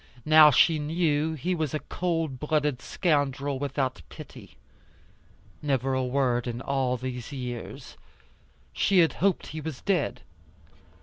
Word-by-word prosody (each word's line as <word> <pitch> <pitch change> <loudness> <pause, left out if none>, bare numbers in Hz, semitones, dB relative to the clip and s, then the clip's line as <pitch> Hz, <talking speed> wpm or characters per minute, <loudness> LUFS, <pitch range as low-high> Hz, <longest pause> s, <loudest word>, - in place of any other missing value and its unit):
Now, 155 0 +8
she 155 +3 +4
knew 155 0 0
he 175 +5 -2
was 155 -4 -2
a - - -1
cold 165 -8 -3
blooded 150 -3 0
scoundrel, 145 -4 -1
without 135 - -2
pity. - - -12 1.0
Never 135 -2 0
a 130 0 0
word 125 -2 0
in 120 0 -4
all 130 -1 -1
these 125 +1 -6
years. 125 -4 -7 0.8
She 195 - +2
had 165 - +2
hoped 195 -1 +2
he 155 +1 -7
was 150 -3 -6
dead. 185 -7 -1
145 Hz, 130 wpm, -27 LUFS, 130-160 Hz, 1.0 s, Now